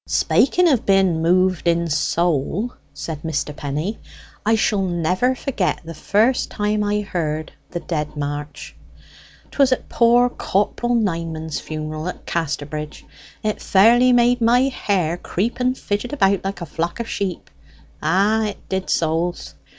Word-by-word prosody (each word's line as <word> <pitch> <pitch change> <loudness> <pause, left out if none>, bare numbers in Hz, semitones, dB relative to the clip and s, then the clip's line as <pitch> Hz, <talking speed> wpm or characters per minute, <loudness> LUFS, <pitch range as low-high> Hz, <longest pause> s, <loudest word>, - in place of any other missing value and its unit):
"Spaking 355 +6 +3
of 270 -8 +3
being 190 -4 +3
moved 185 +1 +2
in 170 0 +2
soul," 170 - 0 0.2
said 150 +1 -6
Mr. 150 -2 -3
Penny, 150 +9 -3 0.4
"I 225 +2 +3
shall 210 -2 +1
never 185 +7 +1
forget 240 -8 -1
the 165 - -7
first 220 - +1
time 210 0 0
I 210 0 0
heard 155 -6 -3 0.2
the 175 - -5
'Dead 150 -2 -3
March.' 145 0 -5 0.8
'Twas 275 -2 +3
at 255 - -1
poor 240 +1 +4
Corp'l 240 +1 -1
Nineman's 165 -7 -2
funeral 155 +1 -5
at 180 - -6
Casterbridge. 150 -2 -4 0.4
It 215 -1 -2
fairly 235 +6 +5
made 245 0 +4
my 235 +2 +4
hair 180 -9 -1
creep 205 +7 -2
and 255 +1 +1
fidget 210 +6 -3
about 195 -8 +2
like 195 -1 -4
a - - -3
vlock 165 +6 -3
of 235 - -3
sheep 195 -5 -4 0.5
ah, 205 +6 +2
it 205 -2 -7
did, 190 0 -2
souls! 165 +2 -1
185 Hz, 145 wpm, -21 LUFS, 160-220 Hz, 0.8 s, fairly